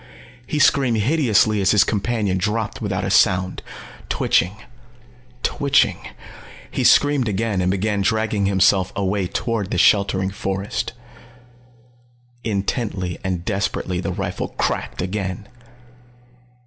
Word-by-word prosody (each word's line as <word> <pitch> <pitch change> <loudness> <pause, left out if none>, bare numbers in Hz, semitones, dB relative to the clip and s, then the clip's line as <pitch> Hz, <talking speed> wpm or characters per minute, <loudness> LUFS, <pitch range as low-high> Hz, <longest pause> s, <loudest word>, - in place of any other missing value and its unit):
He 150 - -2
screamed 135 -4 +3
hideously 110 -4 +2
as 95 - +2
his 105 -1 +5
companion 105 -2 -1
dropped 105 +3 -2
without - - -2
a - - -2
sound, 95 0 +2 0.5
twitching, 90 +4 +1 0.9
twitching 140 -9 +2 0.7
he - - -2
screamed 145 -5 +4
again 105 -1 -1
and 90 - +1
began 100 +2 0
dragging 110 -1 0
himself 95 -1 +3
away 100 -1 -1
toward 110 0 -2
the - - -2
sheltering 95 0 +3
forest. 100 +4 -3 1.5
Intently 100 -3 -2
and 90 -3 -3
desperately 95 -2 -2
the - - -3
rifle - - -3
cracked - - -2
again. 95 +1 -4
100 Hz, 110 wpm, -21 LUFS, 95-110 Hz, 1.5 s, his